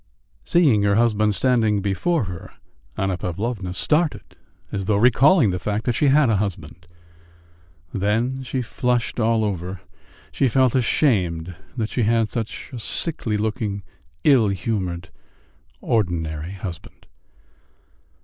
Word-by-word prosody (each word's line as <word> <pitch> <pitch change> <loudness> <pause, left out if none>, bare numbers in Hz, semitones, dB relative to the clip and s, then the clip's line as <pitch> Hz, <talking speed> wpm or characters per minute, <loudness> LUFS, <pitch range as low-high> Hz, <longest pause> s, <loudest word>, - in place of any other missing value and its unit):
Seeing 140 - +3
her 100 0 +2
husband 110 -2 +2
standing 115 -5 +2
before 100 - 0
her, 90 -4 -8 0.4
Anna 95 -2 -1
Pavlovna 95 +1 -3
started 150 - 0 0.4
as 100 -1 -3
though 105 - +2
recalling 125 - +5
the 90 - -2
fact 105 +4 -2
that 120 - +1
she 145 +5 +2
had 140 0 +5
a 110 -3 +2
husband; 90 -4 -5 1.1
then 115 +7 0
she 130 0 -3
flushed 125 0 -1
all 110 -1 +2
over: 90 -2 -4 0.5
she 135 - +1
felt 130 0 +3
ashamed 90 - +1 0.2
that 110 -2 -1
she 125 - -1
had 115 0 +2
such 115 +3 -5
a 125 - -5
sickly 115 -3 0
looking, 105 -2 -2 0.4
ill 130 -7 +5
humoured, 95 -3 -3 0.7
ordinary 85 -6 -1
husband. 90 -3 -8
110 Hz, 125 wpm, -22 LUFS, 95-125 Hz, 1.1 s, recalling